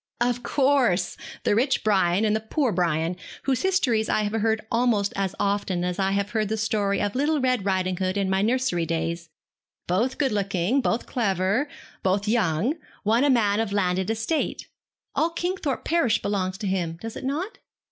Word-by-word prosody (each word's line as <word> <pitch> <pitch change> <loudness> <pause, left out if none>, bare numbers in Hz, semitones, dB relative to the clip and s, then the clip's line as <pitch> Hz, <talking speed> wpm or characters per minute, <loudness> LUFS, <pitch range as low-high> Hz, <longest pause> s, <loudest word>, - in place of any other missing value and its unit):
'Of 245 0 +1
course! 245 -8 +2 0.3
The - - +2
rich 255 +5 +2
Brian, 195 -1 +3
and 215 0 +2
the - - +1
poor 240 +4 0
Brian, 170 -1 0 0.3
whose 265 -2 0
histories 255 -13 +1
I 215 - +2
have 205 - -1
heard 220 0 0
almost 230 -4 +2
as 195 -1 -1
often 200 -3 0
as 180 +1 -2
I 195 0 +1
heard 205 +1 0
the 220 - -1
story 210 -2 0
of 205 -1 -1
"Little 295 +4 +1
Red 255 -5 +1
Ridinghood" 185 0 0
in 195 -1 +1
my 190 0 +1
nursery 220 -7 +1
days. 165 +1 -2 0.6
Both 220 +9 0
good 275 -4 +1
looking, 200 +4 +1
both 235 -1 0
clever, 200 - 0 0.3
both 195 +2 0
young. 215 - +1 0.3
One 225 +5 +3
a 290 - +4
man 215 -5 +3
of 225 -3 -1
landed 190 -1 0
estate. 225 +8 -1 0.5
All 325 - +2
Kingthorpe 340 -4 -2
parish 275 -10 +2
belongs 190 -2 -2
to 205 - -4
him, 175 -4 -1
does 225 +2 -7
it - - -7
not?' 305 +10 -3
210 Hz, 175 wpm, -25 LUFS, 190-245 Hz, 0.6 s, a